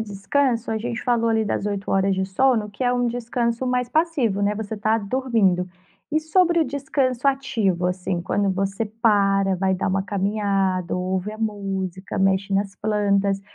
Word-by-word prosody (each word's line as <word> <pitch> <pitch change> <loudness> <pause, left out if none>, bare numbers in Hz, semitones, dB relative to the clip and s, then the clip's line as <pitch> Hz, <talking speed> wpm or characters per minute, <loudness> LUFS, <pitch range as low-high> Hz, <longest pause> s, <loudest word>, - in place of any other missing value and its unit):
descanso, 225 +4 0
a 220 - 0
gente 235 0 -4
falou 235 -2 +1
ali 220 -1 +2
das 205 - -2
8 200 -1 -3
horas 195 0 +2
de 190 0 0
sono, 215 +1 +1
que 205 +5 -4
é 245 - +3
um 245 -1 +1
descanso 240 +1 -2
mais 250 -1 0
passivo, 280 - +1
né, 205 +1 +1
você 220 0 -5
tá 215 +2 +1
dormindo. 200 -5 +1 0.4
E 310 - +2
sobre 340 +1 +3
o - - +3
descanso 275 -2 -1
ativo, 220 -10 +1
assim, 180 -1 -2
quando 200 +2 0
você 195 +3 -1
para, 200 -3 +2
vai 190 +1 +1
dar 185 - -1
uma 190 0 0
caminhada, 195 -3 0
ouve 185 +3 -2
a 215 - -10
música, 195 -4 -3
mexe 195 +1 +1
nas 200 0 -1
plantas, 200 -2 +1
205 Hz, 175 wpm, -23 LUFS, 195-240 Hz, 0.4 s, é